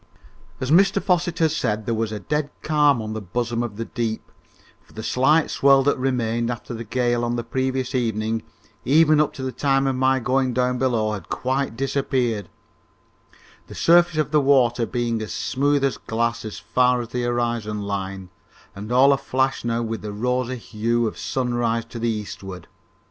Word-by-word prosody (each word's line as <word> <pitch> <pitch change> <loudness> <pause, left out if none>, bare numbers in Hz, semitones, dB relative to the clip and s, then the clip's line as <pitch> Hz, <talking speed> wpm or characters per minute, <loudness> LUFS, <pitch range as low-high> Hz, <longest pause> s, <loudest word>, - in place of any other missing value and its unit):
As 130 +2 -2
Mr 195 +4 +5
Fosset 175 -3 0
had 160 -2 +2
said, 110 -9 -1
there 115 - -1
was 110 -1 -1
a 105 - -4
dead 150 +7 -2
calm 145 -6 +3
on 110 0 -5
the 110 - -4
bosom 115 +4 -2
of 115 -4 -4
the 115 - -3
deep, 115 -2 -4 0.5
for - - -23
the 110 - -7
slight 150 +7 +2
swell 135 -1 +4
that 145 - +2
remained 120 -3 -1
after 120 0 -5
the 115 0 -5
gale 120 +1 0
on 120 0 -1
the 120 - -2
previous 130 +2 -2
evening, 110 -2 -1 0.4
even 155 +2 +5
up 150 - +1
to 130 - -7
the 130 - -2
time 135 0 +1
of 135 -1 0
my 130 +1 +2
going 130 0 0
down 125 0 +1
below, 115 -5 +1
had 105 -2 -6
quite 130 -2 -2
disappeared, 130 -5 -1 1.2
the - - -10
surface 175 -1 +4
of 155 -1 0
the 150 -1 +4
water 125 -4 +3
being 120 -2 -1
as 110 - -5
smooth 145 +1 0
as 135 - +1
glass 115 0 -2
as 110 - -6
far 125 0 +2
as 115 - -7
the 125 0 -2
horizon 120 -3 -1
line 95 -2 -4 0.4
and 105 +3 -7
all 135 +3 +6
aflash 135 0 -1
now 120 0 -1
with 115 -1 -4
the 105 - -5
rosy 125 +4 -1
hue 115 +1 -1
of 110 - -3
sunrise 120 -3 -1
to 115 0 -8
the 115 +1 0
eastward. 95 -4 -6
120 Hz, 185 wpm, -23 LUFS, 115-135 Hz, 1.2 s, all